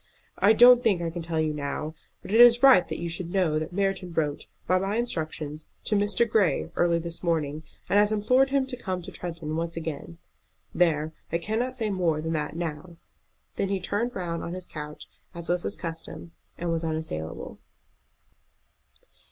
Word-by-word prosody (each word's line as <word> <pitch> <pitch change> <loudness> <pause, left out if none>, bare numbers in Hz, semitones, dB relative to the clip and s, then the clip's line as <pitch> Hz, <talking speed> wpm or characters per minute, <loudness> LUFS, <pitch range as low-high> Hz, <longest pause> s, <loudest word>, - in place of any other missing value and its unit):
"I 200 +3 +6
don't 245 +2 +8
think 200 -6 +3
I 170 -1 -2
can 170 +1 -5
tell 165 -1 -2
you 155 -1 +1
now. 150 +1 -4 0.3
But - - -8
it 225 +3 +6
is 240 +1 +7
right 255 -11 +7
that - - -4
you 170 - -4
should 170 +1 -4
know 175 -5 +2
that 155 - -5
Merton 195 -1 -1
wrote, 150 -3 -2 0.2
by 185 +1 +3
my 195 +2 -1
instructions, 155 -9 -3 0.2
to 210 - 0
Mr. 205 +3 +2
Grey 210 -6 +1
early 170 -1 +3
this 170 0 -5
morning, 155 -3 -1 0.3
and 205 - +4
has 210 +1 +4
implored 250 +6 +3
him 275 -1 +2
to 260 -1 -5
come 185 -7 -4
to - - -8
Tretton 165 -3 -5
once 165 +1 -3
again. 150 - -5 0.6
There! 160 -3 +2 0.2
I 165 - +2
cannot 225 +8 -2
say 220 -4 -2
more 175 -5 +1
than 160 +1 -2
that 150 0 -2
now." 170 +1 -5 0.6
Then 195 - 0
he 195 -1 0
turned 220 +6 -2
round 170 -2 -3
on 170 - -5
his 185 -1 -6
couch, 150 -2 -8 0.3
as 170 0 -6
was 175 0 +1
his 200 - -2
custom, 165 0 -7 0.3
and 170 0 -2
was 165 0 -1
unassailable. 155 - -4
170 Hz, 185 wpm, -26 LUFS, 160-205 Hz, 0.6 s, don't